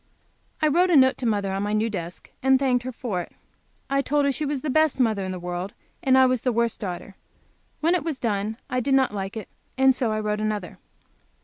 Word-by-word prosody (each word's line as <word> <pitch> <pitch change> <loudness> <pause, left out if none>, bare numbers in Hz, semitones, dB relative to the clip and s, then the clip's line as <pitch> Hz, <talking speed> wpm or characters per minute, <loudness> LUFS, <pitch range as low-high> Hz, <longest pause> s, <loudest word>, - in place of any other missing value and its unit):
I - - +5
wrote 350 +5 +3
a 345 - +4
note 260 -1 +5
to 250 - -1
mother 205 -3 0
on 195 +1 -2
my 205 +1 -1
new 215 +1 +1
desk, 180 -5 -6
and 265 0 +5
thanked 250 -2 +1
her 255 - -3
for 225 -7 -3
it - - -11 0.5
I 275 0 +1
told 290 +1 +1
her 280 - +3
she 295 +2 -3
was 280 -2 -2
the 295 - -2
best 310 -1 +2
mother 220 -5 +2
in 185 - -3
the 185 - -4
world, 180 +2 -5 0.3
and 260 -1 +3
that 265 - +7
I - - +7
was 255 -2 +1
the 255 - +1
worst 235 0 0
daughter. 190 0 -6 0.6
When 330 +3 +3
it 355 -5 +1
was 315 -4 -3
done 215 -2 -2
I 255 - -1
did 270 +2 +2
not 265 -4 +2
like 195 +1 -4
it, 215 - -6 0.3
and 265 0 +5
so 245 -3 0
I 215 - -1
wrote 210 0 -1
another. 210 -4 -3
240 Hz, 245 wpm, -24 LUFS, 205-270 Hz, 0.6 s, that